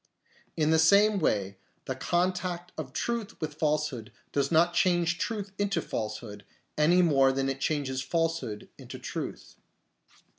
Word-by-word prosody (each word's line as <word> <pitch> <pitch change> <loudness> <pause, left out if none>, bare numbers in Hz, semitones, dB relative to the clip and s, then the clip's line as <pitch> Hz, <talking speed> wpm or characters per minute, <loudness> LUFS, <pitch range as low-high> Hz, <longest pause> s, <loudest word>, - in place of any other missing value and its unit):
In 155 -1 +2
the 160 - +4
same 200 +5 +5
way 100 - 0 0.3
the 130 - -2
contact 180 +3 -1
of 150 -5 -6
truth 230 - -3
with 155 -2 -4
falsehood 150 -6 -1 0.2
does 140 -1 0
not 170 +2 +4
change 175 -1 +2
truth 205 -4 -3
into 205 -1 +1
falsehood, 105 -1 -5 0.3
any 175 +4 +4
more 135 -5 +4
than 135 0 -1
it 135 0 -4
changes 135 -4 -1
falsehood 165 -9 -2
into - - -9
truth. - - -6
160 Hz, 140 wpm, -28 LUFS, 135-175 Hz, 0.3 s, same